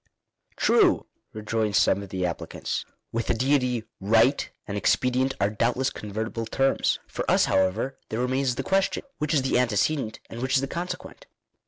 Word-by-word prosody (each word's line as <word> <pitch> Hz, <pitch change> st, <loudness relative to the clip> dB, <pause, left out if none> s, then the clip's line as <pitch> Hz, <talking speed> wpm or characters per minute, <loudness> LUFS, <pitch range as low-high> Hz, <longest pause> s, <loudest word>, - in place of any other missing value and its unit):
" -, -, -57 dB
True," -, -, +4 dB, 0.3 s
rejoin 110 Hz, 0 st, -2 dB
some 100 Hz, -, +3 dB
of 100 Hz, -, -9 dB
the 95 Hz, -1 st, -2 dB
applicants. 85 Hz, -, -3 dB
" -, -, -52 dB
With 115 Hz, 0 st, -2 dB
the -, -, +2 dB
Deity 125 Hz, -2 st, +1 dB, 0.2 s
right 115 Hz, +7 st, +3 dB, 0.2 s
and 100 Hz, -, -4 dB
expedient 125 Hz, +5 st, +1 dB
are 100 Hz, +1 st, +2 dB
doubtless 120 Hz, +5 st, 0 dB
convertible 110 Hz, +2 st, -4 dB
terms. 135 Hz, +3 st, +1 dB
For -, -, -4 dB
us, -, -, +5 dB
however, 95 Hz, +8 st, 0 dB
there 110 Hz, -, -3 dB
remains 130 Hz, 0 st, 0 dB
the -, -, -3 dB
question 195 Hz, 0 st, +1 dB
— -, -, -50 dB
which 150 Hz, +1 st, 0 dB
is 140 Hz, -, +2 dB
the 130 Hz, -2 st, +2 dB
antecedent, 115 Hz, +1 st, 0 dB
and 115 Hz, -, -8 dB
which 130 Hz, +1 st, 0 dB
is 135 Hz, -, +4 dB
the 135 Hz, -, -2 dB
consequent? 180 Hz, -, -6 dB
120 Hz, 180 wpm, -26 LUFS, 110-135 Hz, 0.3 s, us